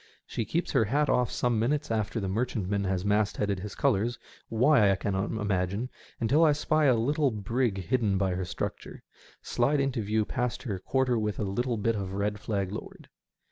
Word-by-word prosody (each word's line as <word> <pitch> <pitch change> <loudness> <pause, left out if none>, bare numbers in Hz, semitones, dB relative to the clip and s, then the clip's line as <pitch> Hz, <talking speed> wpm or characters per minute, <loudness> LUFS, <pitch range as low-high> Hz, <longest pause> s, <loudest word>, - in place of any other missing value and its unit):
She 115 - -3
keeps 170 +8 -1
her 125 -6 +3
hat 145 +6 +1
off 125 -1 +2
some 120 -3 0
minutes 145 +4 0
after 110 +1 -1
the 100 - -2
merchantman 100 -2 -1
has 95 0 -1
mastheaded 105 -1 +1
his 100 +1 -7
colours, 120 -2 +1 0.3
why 115 -2 +4
I 95 - +4
cannot 95 0 -1
imagine, 105 +2 -1 0.3
until 140 +8 +3
I 155 -2 +5
spy 155 +1 +1
a 130 -3 +5
little 140 +5 +2
brig 110 0 -1
hidden 100 +2 +1
by 95 -1 +1
her 95 +1 -2
structure, - - -5 0.4
slide 145 +1 +1
into 135 -3 0
view 105 +1 0
past 125 0 -2
her 100 -7 -3
quarter 125 +2 +1
with 105 -1 -2
a - - -1
little 115 +5 -1
bit 115 +2 +1
of 95 -2 -3
a - - -4
red 105 0 -1
flag 100 -3 -2
lowered. 105 - -8
110 Hz, 190 wpm, -28 LUFS, 100-125 Hz, 0.4 s, I